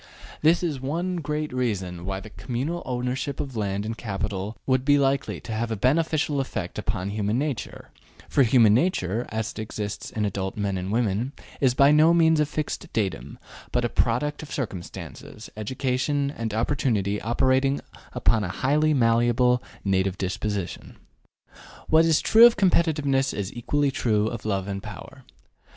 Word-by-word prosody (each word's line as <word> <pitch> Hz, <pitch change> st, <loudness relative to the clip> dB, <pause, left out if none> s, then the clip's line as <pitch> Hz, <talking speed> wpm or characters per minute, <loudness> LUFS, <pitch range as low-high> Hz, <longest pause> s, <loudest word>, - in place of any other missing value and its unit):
This 165 Hz, +3 st, +4 dB
is 150 Hz, -7 st, -2 dB
one 170 Hz, +7 st, -2 dB
great 150 Hz, -2 st, -3 dB
reason 95 Hz, -9 st, -2 dB
why 95 Hz, 0 st, -3 dB
the 105 Hz, +1 st, -11 dB
communal 125 Hz, -, -3 dB
ownership 130 Hz, +2 st, -2 dB
of 135 Hz, -3 st, -4 dB
land 100 Hz, -1 st, -2 dB
and 110 Hz, +1 st, -3 dB
capital 105 Hz, -1 st, -4 dB
would 130 Hz, -1 st, +2 dB
be 145 Hz, +1 st, +4 dB
likely 140 Hz, -1 st, 0 dB
to -, -, -8 dB
have 110 Hz, +1 st, -2 dB
a 110 Hz, -, -1 dB
beneficial 150 Hz, -, +1 dB
effect 100 Hz, -8 st, -5 dB
upon 100 Hz, -2 st, -2 dB
human 105 Hz, +2 st, -1 dB
nature, 140 Hz, -3 st, -4 dB, 0.4 s
for -, -, +2 dB
human 115 Hz, -4 st, +5 dB
nature, 120 Hz, -, 0 dB
as 110 Hz, 0 st, -3 dB
it -, -, -10 dB
exists 105 Hz, -1 st, -5 dB
in 105 Hz, -1 st, -2 dB
adult 95 Hz, -1 st, -3 dB
men 100 Hz, -2 st, -1 dB
and 95 Hz, +1 st, -3 dB
women, 115 Hz, +3 st, 0 dB, 0.3 s
is 130 Hz, -3 st, +2 dB
by 140 Hz, +2 st, +6 dB
no 155 Hz, +3 st, +5 dB
means 160 Hz, -2 st, +4 dB
a 150 Hz, -, +2 dB
fixed 150 Hz, 0 st, -4 dB
datum, 80 Hz, -, -2 dB, 0.3 s
but 125 Hz, -1 st, +1 dB
a -, -, 0 dB
product 130 Hz, +8 st, 0 dB
of 155 Hz, -, -10 dB
circumstances, 105 Hz, -, -7 dB
education 130 Hz, +5 st, -1 dB
and 115 Hz, -1 st, -3 dB
opportunity 110 Hz, -3 st, 0 dB
operating 130 Hz, +4 st, +2 dB, 0.3 s
upon 110 Hz, -2 st, +2 dB
a -, -, -2 dB
highly 145 Hz, -, +2 dB
malleable 120 Hz, +1 st, +3 dB, 0.2 s
native 95 Hz, -1 st, +1 dB
disposition. 100 Hz, 0 st, -4 dB, 0.9 s
What 160 Hz, +1 st, +5 dB
is 160 Hz, -2 st, +3 dB
true 230 Hz, +2 st, +8 dB
of 240 Hz, -, 0 dB
competitiveness 150 Hz, -7 st, +2 dB
is 100 Hz, -1 st, -3 dB
equally 140 Hz, +4 st, 0 dB
true 110 Hz, -5 st, +1 dB
of 115 Hz, -2 st, -7 dB
love 100 Hz, -2 st, -1 dB
of 100 Hz, -1 st, -4 dB
power. -, -, -10 dB
120 Hz, 160 wpm, -25 LUFS, 105-140 Hz, 0.9 s, true